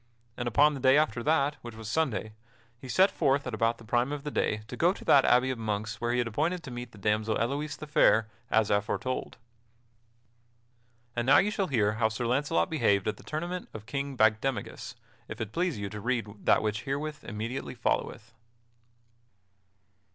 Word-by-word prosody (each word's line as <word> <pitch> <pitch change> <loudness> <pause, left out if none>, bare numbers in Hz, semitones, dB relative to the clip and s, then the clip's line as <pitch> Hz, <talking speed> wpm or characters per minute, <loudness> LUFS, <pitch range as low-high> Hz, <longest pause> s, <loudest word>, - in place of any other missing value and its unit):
And 120 - -3
upon 145 +6 +4
the 140 - -5
day 130 +1 +5
after 150 -5 +1
that, 145 +1 +1
which 120 -2 -9
was 110 -1 -8
Sunday, 115 -6 -1 0.5
he 130 - -10
set 190 +8 +4
forth 140 -2 +1
at 125 - -4
about 115 +2 +1
the - - -14
prime 120 +4 0
of 145 -1 -4
the 150 - -4
day 105 -5 -1
to - - -7
go 175 +3 +3
to - - -12
that 140 -2 +6
abbey 125 +2 +4
of 125 - -5
monks 105 -1 -3
where 120 0 0
he 120 - +1
had 120 -1 +1
appointed 160 +10 -1
to 135 - -8
meet 120 -1 -7
the 105 - -15
damsel 105 +2 0
Elouise 145 +6 -2
the - - -7
Fair, 115 -6 +4 0.2
as 110 -1 +2
aforetold. 105 +5 -1 1.8
And 120 +1 -1
now 135 - +7
you 210 - +3
shall 200 -3 -1
hear 110 -8 +2
how 110 +1 +1
Sir 110 +2 -3
Launcelot 125 -8 +1
behaved 110 -10 +1
at 110 - -1
the - - -15
tournament 175 +4 -4
of 110 -1 -8
King 140 +3 -4
Bagdemagus, 110 +1 0 0.3
if - - -8
it 110 -2 -4
please 175 -5 0
you 100 -1 -4
to 105 - -6
read 110 -4 -3
that - - +5
which 105 0 -1
herewith 145 +2 -4
immediately 115 +5 -5
followeth. 115 -1 -2
120 Hz, 195 wpm, -29 LUFS, 110-145 Hz, 1.8 s, now